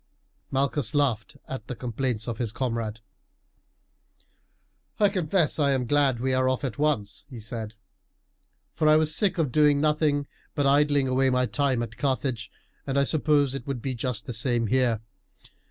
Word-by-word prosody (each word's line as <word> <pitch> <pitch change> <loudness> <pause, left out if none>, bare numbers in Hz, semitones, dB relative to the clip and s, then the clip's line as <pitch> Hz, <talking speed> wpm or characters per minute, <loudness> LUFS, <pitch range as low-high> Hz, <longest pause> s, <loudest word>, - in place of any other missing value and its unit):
Malchus 140 +1 0
laughed 140 -1 0
at 130 -5 -6
the 125 - -5
complaints 120 -1 -3
of 115 -2 -4
his 115 -4 -2
comrade. 115 -3 -3 2.0
"I 205 -1 +5
confess 180 -4 0
I 140 -2 +3
am 130 -2 0
glad 140 -2 +2
we 130 +1 0
are 130 0 +2
off 130 +2 -1
at 135 0 -4
once," 110 -10 0
he 125 -4 -8
said, 110 -1 -6 1.0
"for 155 - +1
I 155 - +7
was 155 0 +2
sick 195 +3 +1
of 155 -6 0
doing 150 0 +4
nothing 150 -1 +1 0.3
but 145 - +1
idling 145 0 +3
away 130 +1 +2
my 125 0 +2
time 130 -3 0
at 115 -1 -8
Carthage; 130 -4 -1 0.4
and 135 0 -1
I 140 - +4
suppose 145 -2 +2
it 135 -2 -6
would 135 -4 -4
be 135 - -2
just 120 -2 -3
the 125 - -5
same 120 0 +1
here. 120 -2 +1
135 Hz, 170 wpm, -26 LUFS, 120-145 Hz, 2.0 s, I